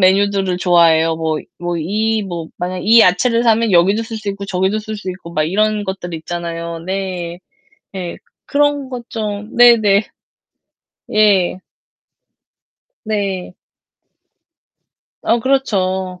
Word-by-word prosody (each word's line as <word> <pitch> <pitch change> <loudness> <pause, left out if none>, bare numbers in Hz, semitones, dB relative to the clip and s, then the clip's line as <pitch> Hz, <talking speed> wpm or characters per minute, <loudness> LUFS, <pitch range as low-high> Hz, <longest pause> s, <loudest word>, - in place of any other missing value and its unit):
메뉴들을 195 -1 +2
좋아해요. 165 -3 +4
뭐 160 -1 -1 0.2
뭐 175 0 -3
이 215 +6 0
뭐 170 -4 -6
만약에 180 0 -3
이 230 +2 +7
야채를 230 +5 +3
사면 230 -2 +3
여기도 190 +5 +4
쓸 225 0 -6
수 210 -1 -6
있고, 200 0 -6
저기도 190 +3 0
쓸 215 0 -6
수 195 -2 -8
있고 180 -2 -10
막 155 -1 +1
이런 210 +4 0
것들 190 -2 -5
있잖아요. 170 0 -5
네. 180 -1 -4 0.6
예. 180 -2 -5 0.3
그런 290 -1 +1
것 245 -2 -7
좀 210 -1 -5
네네. 220 -4 +6 1.1
예. 195 -4 +3 1.4
네. 195 -4 -3 1.7
아 235 - +2
그렇죠. 190 -8 0
190 Hz, 215 characters per minute, -17 LUFS, 175-215 Hz, 1.7 s, 이